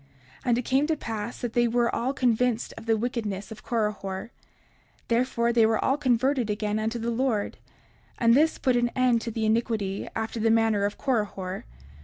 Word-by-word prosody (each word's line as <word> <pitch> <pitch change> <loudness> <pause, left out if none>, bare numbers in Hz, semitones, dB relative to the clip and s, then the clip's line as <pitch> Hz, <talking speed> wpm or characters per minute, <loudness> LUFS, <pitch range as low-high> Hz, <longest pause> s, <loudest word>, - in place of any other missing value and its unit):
30:58 - - -31
And 240 -1 +3
it - - +1
came 275 +3 +2
to 320 -1 0
pass 225 -2 -5
that 240 -2 -3
they 240 0 +3
were 235 0 +1
all 250 +3 0
convinced 245 -2 +1
of 225 0 -11
the 225 -1 +3
wickedness 215 -4 -3
of 220 - -9
Korihor; 210 -2 -2 0.8
therefore 235 0 +1
they 230 -1 +5
were 220 0 +2
all 270 - +3
converted 260 -2 +1
again 210 0 -1
unto 220 +2 -1
the 235 +1 -2
Lord; 230 -3 -1 0.6
and 230 -1 +4
this 310 +5 +4
put 255 -2 +1
an 240 0 +2
end 250 -3 +3
to 230 - -4
the 225 0 -2
iniquity 215 -3 0
after 225 +1 -3
the 225 +1 +2
manner 225 -2 +3
of 205 - -3
Korihor. 200 -7 -2
230 Hz, 190 wpm, -26 LUFS, 215-245 Hz, 0.8 s, they